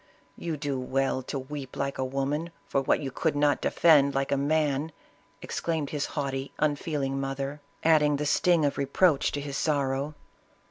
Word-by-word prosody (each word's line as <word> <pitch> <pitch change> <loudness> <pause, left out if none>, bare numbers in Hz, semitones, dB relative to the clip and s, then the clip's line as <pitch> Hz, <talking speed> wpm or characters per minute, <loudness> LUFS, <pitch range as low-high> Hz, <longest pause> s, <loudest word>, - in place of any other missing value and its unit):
" - - -35
You 165 -3 -4
do 140 -2 -2
well 130 +1 0
to 130 - -5
weep 135 0 -7
like 140 0 -2
a - - +1
woman 135 +5 -2 0.2
for 135 - 0
what 135 - +2
you 135 -2 -4
could 160 +3 0
not 145 0 +2
defend 145 -5 +4
like 135 0 0
a - - +4
man," 145 +1 +1 0.5
exclaimed 160 -4 -2
his 145 -2 -1
haughty, 135 -1 -2
unfeeling 145 -2 -1
mother, 135 +2 -4 0.2
adding 150 -2 +4
the 150 +1 -2
sting 170 +1 +3
of 140 - -1
re 140 - 0
proach 155 0 +3
to 145 - -3
his 140 -1 -4
sorrow. 140 -1 0
140 Hz, 180 wpm, -28 LUFS, 135-150 Hz, 0.5 s, defend